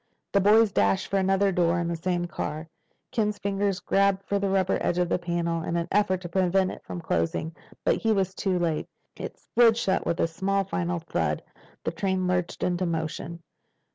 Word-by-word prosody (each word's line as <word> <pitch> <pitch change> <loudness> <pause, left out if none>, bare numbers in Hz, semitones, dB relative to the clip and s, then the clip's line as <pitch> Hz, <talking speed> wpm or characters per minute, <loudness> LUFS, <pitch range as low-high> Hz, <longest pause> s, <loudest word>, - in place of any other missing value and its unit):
The 200 - +3
boys 215 +2 +5
dashed 100 - +2
for 195 - +2
another 195 +1 +2
door 175 -1 +2
in 170 - -1
the 170 - -1
same 175 +1 -1
car. 155 -1 -4 0.4
Ken's 210 -2 0
fingers 200 -1 -1
grabbed 195 -1 +2
for 200 - 0
the 200 0 0
rubber 190 -1 +2
edge 175 - 0
of 180 -1 +1
the - - +1
panel 170 -1 -1
in 170 +1 -2
an 170 - -1
effort 190 -2 +2
to 175 - -5
prevent 185 +1 +2
it - - -10
from 175 - -6
closing. 160 - -1 0.3
But - - +3
he 225 - +1
was 190 -3 +1
too 190 -1 0
late. 165 -3 -1 0.3
It - - -7
slid 230 -2 +3
shut 195 -5 +1
with 170 - 0
a - - +4
small 195 +4 0
final 175 -2 -2
thud. 80 - -2 0.4
The - - -1
train 185 +2 -1
lurched 180 -1 -1
into 180 0 0
motion. 165 0 -4
180 Hz, 200 wpm, -26 LUFS, 170-195 Hz, 0.4 s, boys